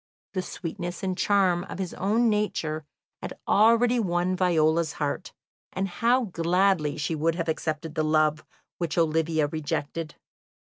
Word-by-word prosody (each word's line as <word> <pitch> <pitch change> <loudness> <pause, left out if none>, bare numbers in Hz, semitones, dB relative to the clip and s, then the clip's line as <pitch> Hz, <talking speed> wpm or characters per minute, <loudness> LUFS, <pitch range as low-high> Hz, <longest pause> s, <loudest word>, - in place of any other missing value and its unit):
The 185 - -1
sweetness 175 0 -6
and 185 -1 -1
charm 185 -3 +2
of - - -7
his 190 -2 -4
own 220 +5 +1
nature 165 -8 -1 0.4
had - - -6
already 230 +3 +4
won 180 -2 0
Viola's 165 -3 +2
heart, 150 +4 -3 0.4
and 190 +1 -1
how 235 +7 +2
gladly 175 -4 +1
she 150 +2 -2
would 160 +1 0
have 170 -1 -3
accepted 155 0 -2
the 155 - 0
love 155 0 +2 0.4
which 170 -2 -2
Olivia 160 -1 +2
rejected! 150 +1 -3
170 Hz, 140 wpm, -26 LUFS, 155-195 Hz, 0.4 s, already